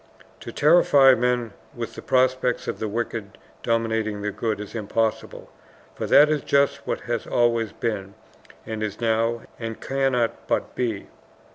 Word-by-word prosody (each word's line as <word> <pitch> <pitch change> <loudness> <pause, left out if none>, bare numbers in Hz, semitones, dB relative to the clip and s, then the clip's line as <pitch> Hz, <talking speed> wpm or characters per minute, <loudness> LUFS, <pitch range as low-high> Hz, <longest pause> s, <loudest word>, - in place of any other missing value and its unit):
To - - -8
terrify 145 -4 +5
men 125 -2 0 0.2
with - - -5
the - - -9
prospect 130 -1 +1
of - - -3
the 110 - -2
wicked 115 -1 -4 0.2
dominating 110 -2 -1
the 105 - -1
good 105 +1 -2
is 105 - -8
impossible, 110 0 -2 0.4
for - - -4
that 145 +2 +7
is 150 -1 0
just 140 0 +1
what - - -2
has 120 -2 -3
always 115 -2 +1
been, 100 -4 -4 0.5
and 110 -1 -5
is 105 -1 -4
now, 115 0 0 0.2
and 115 -1 -5
cannot 135 -4 -1
but - - -1
be. 115 -5 -2
115 Hz, 150 wpm, -24 LUFS, 110-125 Hz, 0.5 s, that